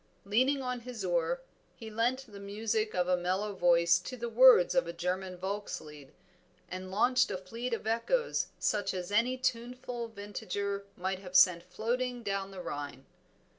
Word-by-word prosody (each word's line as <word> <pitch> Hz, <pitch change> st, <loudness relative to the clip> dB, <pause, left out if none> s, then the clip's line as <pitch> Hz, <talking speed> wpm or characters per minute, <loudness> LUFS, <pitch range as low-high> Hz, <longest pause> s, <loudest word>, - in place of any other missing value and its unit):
Leaning 260 Hz, +7 st, +2 dB
on 250 Hz, -1 st, -2 dB
his 240 Hz, -1 st, -6 dB
oar -, -, 0 dB, 0.3 s
he 225 Hz, -1 st, -9 dB
lent 245 Hz, +5 st, 0 dB
the 205 Hz, -4 st, -12 dB
music 215 Hz, +2 st, -2 dB
of 180 Hz, -1 st, +1 dB
a 180 Hz, -, +4 dB
mellow 185 Hz, +4 st, -1 dB
voice 170 Hz, -1 st, +4 dB
to 255 Hz, +8 st, -7 dB
the 235 Hz, 0 st, -4 dB
words 245 Hz, -5 st, +7 dB
of 265 Hz, -, +2 dB
a 170 Hz, -, -4 dB
German 180 Hz, +2 st, -3 dB
Volkslied, 175 Hz, -7 st, -5 dB, 0.6 s
and 185 Hz, 0 st, -6 dB
launched 250 Hz, +6 st, +3 dB
a -, -, -2 dB
fleet 230 Hz, +7 st, -5 dB
of 230 Hz, -, -3 dB
echoes 235 Hz, -, +1 dB
such 205 Hz, -2 st, 0 dB
as 180 Hz, +1 st, -4 dB
any 235 Hz, +5 st, +2 dB
tuneful 250 Hz, -1 st, -3 dB
vintager 200 Hz, -1 st, -4 dB
might 190 Hz, +1 st, -2 dB
have 185 Hz, -1 st, -10 dB
sent 180 Hz, -2 st, +7 dB
floating 240 Hz, +6 st, -2 dB
down 195 Hz, -1 st, -2 dB
the 190 Hz, -2 st, -8 dB
Rhine. 145 Hz, -2 st, -6 dB
205 Hz, 165 wpm, -31 LUFS, 185-245 Hz, 0.6 s, words